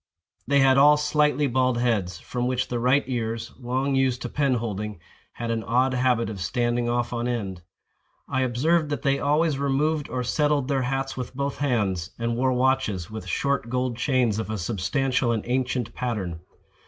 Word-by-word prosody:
They 140 0 +4
had 135 0 +5
all 150 +1 +7
slightly 150 0 +2
bald 130 -1 +1
heads, 105 -7 0
from 125 +7 -3
which 130 0 -1
the 120 - -1
right 130 +4 +3
ears, 115 -2 -3
long 130 +3 -1
used 130 -2 +1
to 125 - -3
pen 140 -2 +1
holding, 105 -4 -4 0.3
had 115 -1 -4
an 115 -1 -1
odd 125 +6 +2
habit 125 -2 +2
of 100 -4 -6
standing 120 +2 0
off 120 0 -1
on 120 0 -1
end. 100 -7 -3 0.7
I 130 - 0
observed 150 +6 +1
that 145 -3 -3
they 140 0 +2
always 150 0 +1
removed 145 +2 0
or 125 -1 -2
settled 145 +1 +1
their 135 -2 +1
hats 135 +1 -2
with 125 0 -6
both 140 +1 -3
hands, 100 - 0
and 115 0 -1
wore 130 +2 +2
watches, 125 -9 0
with 110 -4 -7
short 140 +3 -1
gold 125 0 -1
chains 120 -4 +1
of 110 -2 -4
a 110 - -2
substantial 120 - 0
and 110 -2 -1
ancient 125 -2 -1
pattern. 100 -9 -3
125 Hz, 180 wpm, -25 LUFS, 115-135 Hz, 0.7 s, all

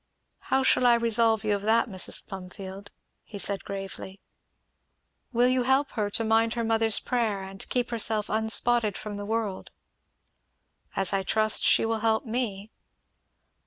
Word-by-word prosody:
"How 265 0 +2
shall 250 -1 +3
I 240 - +6
resolve 230 -2 +2
you 210 -1 +1
of 200 - -2
that, 225 +3 +2
Mrs. 185 -5 -1
Plumfield?" 190 +1 -9 0.3
he 210 - -10
said 200 0 -2
gravely. 195 0 -7 1.1
"Will 240 0 +3
you 255 0 +2
help 265 +3 +1
her 210 -3 -2
to 225 - -1
mind 225 +1 +2
her 235 - -1
mother's 225 -1 +2
prayer 220 -6 -1
and 195 0 -9
keep 245 -1 -1
herself 220 -2 0
unspotted 220 0 +1
from 210 -1 -6
the 205 - -6
world?" 220 -3 -3 1.3
"As 195 0 0
I 195 - +1
trust 215 +2 +2
she - - +4
will 225 0 -1
help 220 +2 0
me." 220 -3 -3
220 Hz, 155 wpm, -26 LUFS, 200-230 Hz, 1.3 s, I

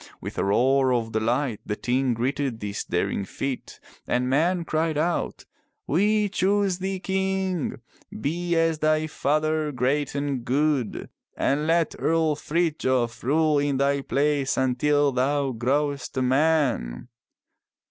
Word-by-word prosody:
With - - -6
a - - +1
roar 130 +6 +3
of 115 -2 -1
delight 115 +2 0
the 105 - -3
Ting 125 +2 0
greeted 130 0 -2
this 105 -1 -4
daring 100 - -1
feat 130 +6 -5 0.3
and 125 +1 0
men 165 +6 +1
cried 160 -1 0
out: 170 +3 -1 0.2
" - - -51
We 210 +6 +2
choose 195 -1 +1
thee 190 0 -3
king. 190 -3 -1 0.4
Be 170 +7 -1
as 165 -1 +2
thy 155 0 +2
father 155 0 0
great 135 +3 0
and 140 -3 -2
good. 135 -2 0 0.3
And 150 +3 +1
let 165 0 +2
Earl 160 -2 +2
Frithjof 145 -7 0
rule 150 +3 +2
in 140 -1 0
thy 140 +1 +1
place 140 0 0
until 140 +3 +2
thou 135 +2 0
growest 140 +4 -1
a 130 - +2
man. 130 - +1
145 Hz, 135 wpm, -25 LUFS, 130-160 Hz, 0.4 s, roar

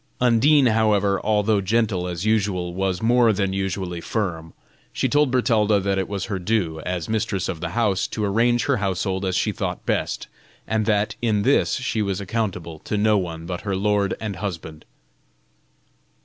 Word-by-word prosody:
Undine, 130 +4 +4
however, 105 -4 +2
although 105 -1 +2
gentle 100 -3 0
as 90 +2 -4
usual, 95 -5 0
was 95 +1 -2
more 120 0 +4
than 100 -2 -1
usually 95 -2 -3
firm. 85 -8 -3 0.4
She - - 0
told 145 -1 +3
Bertalda 110 -5 +2
that 95 0 0
it 95 - -2
was 100 -3 -3
her 100 -3 -3
due, 90 -5 -1
as 85 0 -3
mistress 110 -4 -1
of 85 -4 -4
the 85 - -2
house, 105 -5 +1
to 105 - -3
arrange 120 +4 +2
her 140 -3 +2
household 95 -1 -1
as 95 -1 -1
she 90 - +1
thought - - -4
best, - - -1 0.4
and 110 -1 -1
that, 105 -1 +1
in 110 -4 +1
this, 135 +5 +3
she 130 -4 -2
was 100 -3 -1
accountable 95 -6 -3
to 105 - -3
no 105 +1 +3
one 85 -3 -5
but 90 0 -5
her 100 -2 -2
lord 100 0 +1
and 105 -4 -4
husband. 80 -6 -6
100 Hz, 175 wpm, -23 LUFS, 95-110 Hz, 0.4 s, Undine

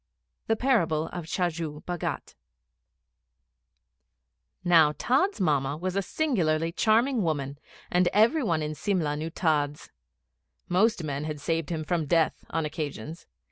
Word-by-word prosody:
The 225 - +2
Parable 170 - +1
of 175 -3 -6
Chajju 165 -4 -2
Bhagat. 175 -2 -4 2.3
Now 165 -4 +5
Tods' 285 - +1
Mamma 145 -5 +1
was 185 +3 -3
a 200 - +2
singularly 170 - 0
charming 230 +6 +2
woman, 145 -5 -2 0.3
and 180 0 +3
every 230 +10 +4
one 165 - 0
in 150 0 -3
Simla 155 -3 -1
knew 155 +2 -4
Tods. 150 -4 -1 0.8
Most 195 +1 +2
men 145 -1 -3
had 155 -1 -4
saved 165 0 -1
him 160 -2 -2
from 165 -1 -1
death 165 0 +1
on 165 -1 -1
occasions. 155 0 -6
165 Hz, 130 wpm, -27 LUFS, 150-185 Hz, 2.3 s, Now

